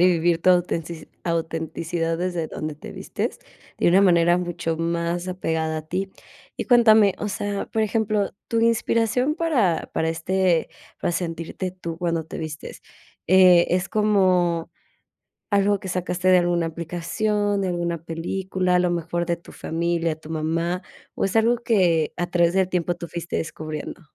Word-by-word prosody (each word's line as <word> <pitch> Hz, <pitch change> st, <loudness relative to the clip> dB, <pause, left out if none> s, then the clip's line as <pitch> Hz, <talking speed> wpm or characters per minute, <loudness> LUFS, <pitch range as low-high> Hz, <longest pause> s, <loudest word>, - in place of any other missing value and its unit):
y 180 Hz, -, +6 dB
vivir 170 Hz, 0 st, +1 dB
tu 185 Hz, -, +5 dB
autentici 170 Hz, -2 st, 0 dB, 0.2 s
autenticidad 165 Hz, 0 st, -2 dB
desde 175 Hz, -3 st, -2 dB
donde 155 Hz, -1 st, -5 dB
te 150 Hz, -, -10 dB
vistes, -, -, -4 dB, 0.4 s
de -, -, +2 dB
una 185 Hz, +3 st, +5 dB
manera 175 Hz, -1 st, +4 dB
mucho 175 Hz, -2 st, -3 dB
más 170 Hz, +2 st, -2 dB
apegada 160 Hz, -3 st, -2 dB
a -, -, -7 dB
ti. 185 Hz, +5 st, -3 dB, 0.5 s
Y -, -, -3 dB
cuéntame, 220 Hz, -5 st, +6 dB
o 210 Hz, -, -3 dB
sea, 200 Hz, +1 st, -3 dB
por 220 Hz, -, -1 dB
ejemplo, 215 Hz, -1 st, 0 dB, 0.2 s
tu 230 Hz, -, 0 dB
inspiración 230 Hz, +5 st, +1 dB
para 245 Hz, -, +1 dB
para, 160 Hz, -, +1 dB
este, 175 Hz, +1 st, +1 dB, 0.3 s
para 175 Hz, -, 0 dB
sentirte 170 Hz, +1 st, -3 dB
tú 170 Hz, -3 st, -7 dB
cuando 170 Hz, -2 st, -1 dB
te -, -, -8 dB
vistes, 155 Hz, -2 st, -7 dB, 0.5 s
eh, 185 Hz, -2 st, +7 dB
¿es 180 Hz, +1 st, 0 dB
como 185 Hz, -5 st, +2 dB, 0.8 s
algo 200 Hz, 0 st, +3 dB
que 190 Hz, -, -7 dB
sacaste 180 Hz, 0 st, -1 dB
de 185 Hz, -1 st, +7 dB
alguna 175 Hz, -1 st, +1 dB
aplicación, 195 Hz, +5 st, -1 dB
de 190 Hz, -, -1 dB
alguna 170 Hz, -2 st, -2 dB
película, 180 Hz, +2 st, -1 dB
a -, -, +4 dB
lo 180 Hz, 0 st, +2 dB
mejor, 170 Hz, 0 st, -2 dB
de 170 Hz, -1 st, 0 dB
tu 170 Hz, -, -15 dB
familia, 165 Hz, -1 st, -1 dB
tu 155 Hz, 0 st, -12 dB
mamá, 165 Hz, +3 st, -1 dB, 0.3 s
o -, -, 0 dB
es 195 Hz, -, -2 dB
algo 230 Hz, +2 st, +3 dB
que 180 Hz, -9 st, +2 dB
a 175 Hz, -, -1 dB
través 175 Hz, 0 st, +2 dB
del 190 Hz, -1 st, +2 dB
tiempo 175 Hz, -1 st, 0 dB
tú 170 Hz, 0 st, -7 dB
fuiste 170 Hz, +1 st, -5 dB
descubriendo? 155 Hz, +1 st, -5 dB
175 Hz, 160 wpm, -23 LUFS, 165-190 Hz, 0.8 s, eh